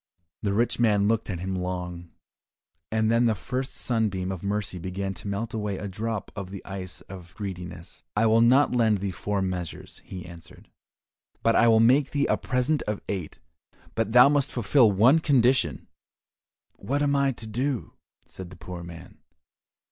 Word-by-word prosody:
The 100 -2 0
rich 120 +3 +1
man 105 -4 +3
looked 115 0 0
at 90 -3 -4
him 95 +1 -3
long, 90 -1 -4 0.8
and 110 0 +2
then 120 +1 +4
the 110 - +2
first 130 +6 -4
sunbeam 105 -6 -1
of 95 -3 -5
mercy 100 -2 -2
began 95 +2 -4
to 100 - -9
melt 100 +3 -3
away 105 -3 -2
a 105 - -5
drop 110 +2 -4
of 100 -2 -6
the 95 0 -9
ice 95 -2 -7
of 90 -2 -12
greediness. 90 -4 -7
"I 105 +2 +3
will 110 +1 +4
not 130 +5 +5
lend 110 -4 +3
thee 100 0 -3
four 100 +2 -2
measures," 90 -3 -5
he 90 -2 -8
answered, 85 -1 -13 0.7
"but 115 - +3
I 115 - +5
will 110 -1 +6
make 130 +5 +4
thee 145 -1 0
a - - +2
present 130 +4 0
of 105 -1 -3
eight, 90 -6 -4 0.6
but 115 -1 -1
thou 125 +3 +8
must 140 -1 +1
fulfil 120 -1 +4
one 120 +11 +5
condition." 130 -4 +2 0.9
"What 145 +2 -1
am 145 0 +2
I 140 -1 +3
to 115 - -8
do?" 125 +3 -2 0.3
said 95 -2 -9
the 95 - -12
poor 85 +2 -8
man. 85 -1 -11
105 Hz, 175 wpm, -26 LUFS, 95-120 Hz, 0.9 s, thou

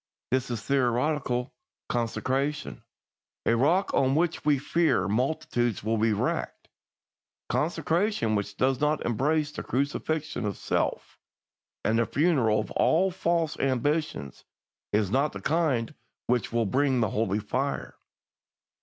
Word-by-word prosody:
This 130 0 +1
is 120 -3 -3
theoretical 125 -1 0 0.3
consecration 130 +5 -2 0.6
a 115 - +3
rock 165 +11 +2
on 135 0 +3
which 170 +1 0
we 150 -1 +3
fear 150 - +1
multitudes 120 -1 0
are 110 +1 +1
being 110 -1 +1
wrecked. - - -2 0.8
Consecration 165 - 0
which 100 -1 -2
does 130 0 +2
not 150 0 +1
embrace 145 +6 +1
the - - -6
crucifixion 150 +2 -2
of 105 -2 -2
self - - -2 0.7
and 115 +1 +2
the 115 - +1
funeral 140 -9 +2
of 105 - -4
all 185 +4 +3
false 170 -3 0
ambitions 135 - -1 0.5
is 105 -2 +1
not 140 +5 +1
the - - -6
kind 150 -7 0 0.3
which 125 -1 0
will 115 -1 +1
bring 130 +4 +2
the 110 - +1
Holy 105 -2 0
Fire. 105 - -2
130 Hz, 125 wpm, -27 LUFS, 115-155 Hz, 0.8 s, a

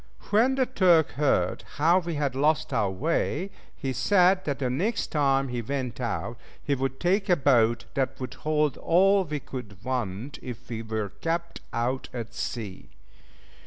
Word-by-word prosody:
When 240 +6 +4
the 265 -1 +2
Turk 180 - +4
heard 130 -11 +1
how 165 +5 +4
we 170 -2 -4
had 145 -3 0
lost 155 +3 +1
our 100 - +2
way, 160 - -1 0.2
he 135 -2 -3
said 185 - +3
that 145 -2 -1
the 135 - -1
next 175 - -1
time 135 -3 +2
he 120 -1 -2
went 130 0 -3
out, 115 0 -3 0.2
he 145 - 0
would 135 0 -2
take 190 +3 +1
a 180 - +6
boat 120 -6 +3
that 135 -1 -1
would 130 -2 -5
hold 150 -3 0
all 195 +3 +4
we 150 -4 -4
could 110 -8 -9
want 125 0 -3
if 120 -2 -8
we 115 -2 -4
were 110 -2 -3
kept 170 +1 -2
out 125 +3 -1
at 115 -2 -5
sea. 105 -6 -5
140 Hz, 165 wpm, -27 LUFS, 120-170 Hz, 0.2 s, a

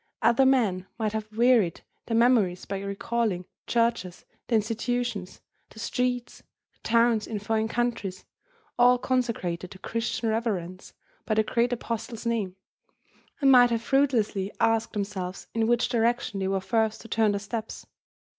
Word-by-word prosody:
Other 260 +3 +5
men 205 -9 +2
might 220 -2 -1
have 215 0 -4
wearied 225 -6 +3 0.3
their 230 - +1
memories 225 -7 +3
by 195 -1 -4
recalling 200 0 -2
the - - -15
churches, 230 -6 0 0.2
the 235 - +1
institutions, 230 -2 -2 0.3
the - - -18
streets, 245 +2 -2 0.3
the - - -37
towns 230 -1 +2
in 220 - -3
foreign 220 +2 -1
countries, 225 -5 -2 0.5
all 250 +1 +6
consecrated 230 -9 -2
to 190 - -11
Christian 230 +3 -2
reverence 195 -5 -3 0.3
by 215 - +1
the 220 - +3
great 235 +2 +1
apostle's 230 -1 -4
name, 215 -6 -1 0.9
and 275 -1 +6
might 245 -2 +7
have 230 -1 -1
fruitlessly 230 -7 +1
asked 225 0 +1
themselves 195 -3 -4
in 225 -1 +1
which 240 0 +2
direction 235 -3 0
they 190 - -1
were 195 0 0
first 220 +1 0
to - - -11
turn 220 -1 +2
their 200 - -1
steps. 220 +2 -6
225 Hz, 150 wpm, -27 LUFS, 200-240 Hz, 0.9 s, might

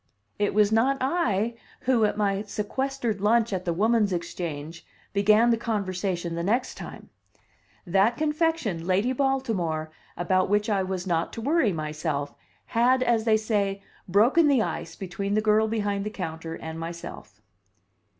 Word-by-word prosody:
It 205 0 0
was 210 0 +4
not 250 +5 +3
I 235 - 0 0.3
who, 250 -4 +3
at 210 - -1
my 200 -1 +1
sequestered 220 +2 -3
lunch 225 +1 +3
at 185 -1 -3
the 170 - 0
Woman's 215 +3 +2
Exchange, 165 -2 -5 0.3
began 215 +4 +4
the 230 - +3
conversation 185 -6 -2
the 170 - -2
next 230 +8 0
time. - - -10 0.7
That 195 +6 +2
confection, 300 - 0
"Lady 200 +7 +2
Baltimore," 220 - -1 0.3
about 185 +2 +1
which 210 +1 +1
I 200 -2 +2
was 185 -1 -3
not 170 -2 0
to 230 - -5
worry 280 -3 +2
myself, 150 -2 -3 0.3
had, 255 +3 +3
as 235 -3 +1
they 220 -2 +4
say, 200 -3 -1 0.2
"broken 235 - +4
the 270 -6 +4
ice" 165 -5 -5
between 195 +2 -3
the - - +3
girl 215 0 +3
behind 205 -2 -1
the 210 - -3
counter 165 -4 -5
and 160 0 -7
myself. 165 -11 -8
205 Hz, 150 wpm, -26 LUFS, 180-230 Hz, 0.7 s, was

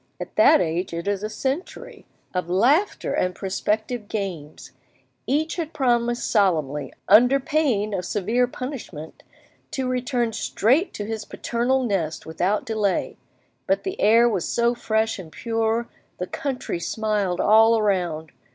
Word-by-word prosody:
at - - -7
that 215 - +6
age 170 +1 -2
it 170 +3 -5
is 200 -1 0
a 215 - -3
century, 265 - -5 0.3
of 180 -2 -2
laughter 270 - +2
and 180 0 0
prospective 210 +3 -2
games! 180 -9 -5 0.6
Each 305 +7 0
had 330 -2 -4
promised 240 -2 +1
solemnly, 155 - +1 0.2
under 245 +6 +6
pain 255 -8 0
of 185 -2 -2
severe 220 +7 0
punishment, 245 - -7 0.5
to 265 -2 -3
return 250 -2 -1
straight 255 - +1
to 205 - -4
his 220 0 -4
paternal 245 +5 -1
nest 185 -9 -2
without 185 +8 -1
delay, 215 -4 -1 0.5
but - - +1
the 380 0 -4
air 230 +3 +6
was 200 -7 -1
so 235 0 +2
fresh 220 -2 -1
and 165 -4 -10
pure, 225 +4 -1 0.3
the 180 - -3
country 255 -6 -4
smiled 205 -1 -1
all 225 +2 +5
around! 175 -7 -1
220 Hz, 140 wpm, -23 LUFS, 185-245 Hz, 0.6 s, that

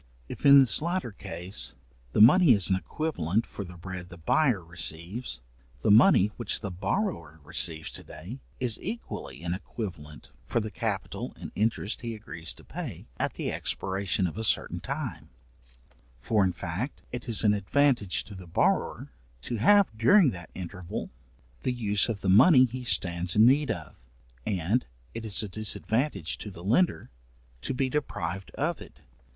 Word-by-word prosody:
If - - -2
in 140 0 +10
this 135 -1 +4
latter 170 -6 -1
case, 95 -4 -4 0.4
the - - +4
money 150 - +8
is 100 -3 +1
an - - +5
equivalent 100 - -1
for 100 - -7
the 90 -1 -11
bread 90 0 -7
the 85 - -11
buyer 105 - +2
receives, 85 - -2 0.4
the - - +4
money 105 -2 +6
which 120 -4 -1
the 100 -3 -4
borrower 90 - -2
receives 80 0 0
to - - -6
day, 95 - -9 0.2
is 120 -4 +1
equally 230 - -6
an 85 0 -1
equivalent 85 -7 -7 0.2
for - - +1
the 110 -1 -4
capital 85 - -4
and - - -7
interest 110 0 -1
he 115 -2 -4
agrees 85 -8 -6
to - - -15
pay - - -7
at - - -1
the - - -2
expiration 95 -1 -1
of 90 +5 -3
a - - -2
certain 110 - +1
time; - - -5 0.9
for 105 - +2
in 95 - +2
fact, 90 - -5
it 125 +1 -6
is 115 - +1
an 105 -1 +5
advantage 105 0 +2
to 105 - -11
the 95 -2 -10
borrower, 85 - 0 0.3
to 120 - -3
have, 200 - +5
during 145 - +5
that 90 -1 -9
interval, 90 -1 -6 0.5
the 100 - -1
use 105 -3 +2
of 105 -4 -3
the - - -3
money 130 - +7
he 125 +1 -6
stands 85 -3 0
in 110 +1 +7
need 140 +3 +4
of, 85 -6 -4 0.5
and 100 +5 0 0.3
it 115 0 -6
is 105 +1 +1
a - - -3
disadvantage 110 - -1
to 105 - -6
the 90 -3 -11
lender 125 - +1 0.5
to 130 - -3
be 130 +1 +1
deprived 95 - -3
of - - -1
it. - - -13
105 Hz, 170 wpm, -28 LUFS, 90-125 Hz, 0.9 s, in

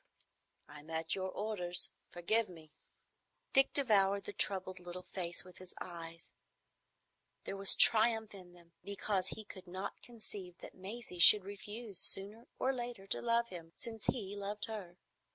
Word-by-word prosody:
"I'm 150 +1 -12
at 160 0 -1
your 190 -1 -2
orders; 185 -4 0 0.2
forgive 210 +5 +1
me." 160 -3 -13 0.8
Dick 270 0 +6
devoured 200 -7 +3
the - - -6
troubled 185 -2 +1
little 175 0 -8
face 175 -2 -4
with 180 0 -15
his 185 -1 -9
eyes. 165 -1 -8 1.1
There - - -4
was 195 0 +7
triumph 220 -1 +5
in 180 -3 -12
them, 170 -1 -19
because 200 -1 -1
he 215 - -7
could 190 -2 -10
not 185 +3 -5
conceive 205 -6 -8
that - - -11
Maisie 195 -1 -8
should 200 +3 +9
refuse 205 0 -5
sooner 205 +5 0
or 265 - +1
later 240 -5 -5
to - - -1
love 235 0 +2
him, 165 -2 -9
since 225 -2 -5
he 205 -6 -1
loved 205 +1 -4
her. 195 -6 -7
195 Hz, 150 wpm, -35 LUFS, 180-220 Hz, 1.1 s, should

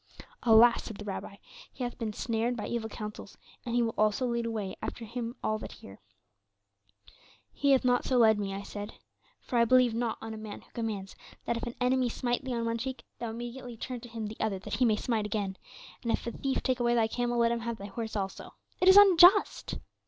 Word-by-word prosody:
"'Alas,' 230 0 +6
said 220 - -7
the 210 - -8
Rabbi, 200 0 -5 0.4
'he 255 - -5
hath 245 - -4
been 225 -2 -2
snared 230 +2 -1
by 210 - -4
evil 230 -2 -3
counsels, 210 -1 -8 0.3
and 240 -1 -3
he 240 - +3
will 225 - -1
also 215 +4 +2
lead 235 -1 -1
away 210 -4 -3
after 230 - -5
him 235 +1 -5
all 215 0 0
that - - -8
hear.' 95 - -13 1.5
"'He 285 - 0
hath 260 - +3
not 245 0 +3
so 255 - +1
led 220 -3 +5
me,' 200 -1 -2
I 195 +1 -5
said, 205 +1 -7 0.5
'for 240 - -1
I 235 - +5
believe 250 0 +4
not 230 0 -1
on 225 0 -6
a - - -7
man 215 -1 -8
who - - -24
commands 215 -5 -4 0.3
that 235 - 0
if 230 - -4
an 240 - -6
enemy 250 0 +2
smite 245 +2 -1
thee 260 -2 -3
on 230 0 -1
one 230 0 -1
cheek, 260 +2 -5 0.2
thou 235 - -3
immediately 240 +1 -7
turn 250 +2 -5
to 240 - -11
him 225 -1 -5
the 215 +1 -7
other 215 -3 0
that 190 - -8
he 255 - +3
may 220 -2 +4
smite 215 -1 -1
again; 200 -2 -2 0.5
and 235 - -1
if - - -1
a 235 - -2
thief 270 +3 -2
take 255 -1 0
away 240 0 +2
thy 230 -2 +4
camel 240 +1 -1
let 235 0 +3
him 235 - 0
have 230 0 -4
thy 200 - -8
horse 220 +2 -5
also; 195 -2 -4 0.2
it 365 - +2
is 380 - +9
unjust! 385 0 +6
230 Hz, 230 wpm, -30 LUFS, 215-245 Hz, 1.5 s, is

